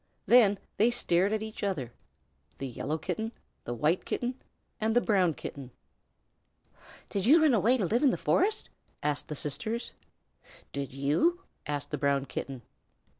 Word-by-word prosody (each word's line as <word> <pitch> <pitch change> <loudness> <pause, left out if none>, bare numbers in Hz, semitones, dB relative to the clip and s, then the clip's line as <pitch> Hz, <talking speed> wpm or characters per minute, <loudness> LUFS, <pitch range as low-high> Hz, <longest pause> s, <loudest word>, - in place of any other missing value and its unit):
Then 215 -5 +6 0.2
they 220 +4 +5
stared 190 -4 +2
at 220 0 -1
each 220 0 -7
other 150 - -2 0.6
the 135 - -5
Yellow 135 +4 -3
Kitten, 220 +8 -4 0.3
the 120 - -3
White 155 +9 +1
Kitten, 245 +1 -2 0.5
and 220 +1 0
the - - +7
Brown 185 -9 +2
Kitten. 135 -3 -7 1.4
"Did 200 +1 -1
you 310 +6 +8
run 300 -4 +5
away 230 +4 +4
to 205 - 0
live 230 +8 +1
in 290 - +5
the - - 0
forest?" 425 +4 +1 0.3
asked 145 -1 0
the 150 - -5
sisters. 220 - -1 0.8
"Did 140 -1 -4
you?" 150 - +1 0.3
asked 145 -1 -3
the 150 - -2
Brown 140 -1 +1
Kitten. 135 -3 -6
190 Hz, 155 wpm, -29 LUFS, 140-230 Hz, 1.4 s, you